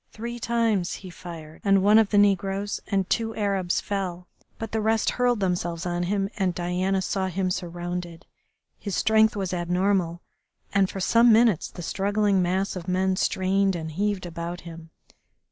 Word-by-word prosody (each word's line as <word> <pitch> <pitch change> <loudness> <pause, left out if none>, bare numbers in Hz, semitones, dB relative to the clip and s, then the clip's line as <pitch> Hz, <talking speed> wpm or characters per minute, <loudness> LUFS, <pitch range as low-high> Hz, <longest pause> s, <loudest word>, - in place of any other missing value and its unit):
Three 235 +2 -6
times 225 -6 0
he 185 - -8
fired 165 -3 -10
and 195 -1 +4
one 210 +2 +6
of 220 -3 +3
the 205 - +2
negroes 200 0 +2
and 195 -2 0
two 225 +1 -1
Arabs 195 -4 0
fell, 180 -3 -4 0.3
but 225 -1 -6
the 220 - -1
rest 220 +1 +2
hurled 245 -3 +1
themselves 175 -2 -1
on 175 0 -1
him, 195 +2 0
and 185 -3 0
Diana 185 +2 0
saw 190 +1 -1
him 185 0 -1
surrounded. 175 -1 -5 0.5
His 200 -3 -4
strength 220 0 +3
was 190 -3 -2
abnormal, 180 0 0 0.5
and 195 -1 +3
for 195 - -6
some 230 +5 +5
minutes 220 -6 +4
the 175 - -9
struggling 200 +1 +1
mass 190 +3 0
of 180 -1 -7
men 185 +1 +1
strained 190 +1 +1
and 160 -2 -5
heaved 200 +2 -1
about 170 +1 -5
him. 165 -1 -10
190 Hz, 165 wpm, -25 LUFS, 175-205 Hz, 0.5 s, one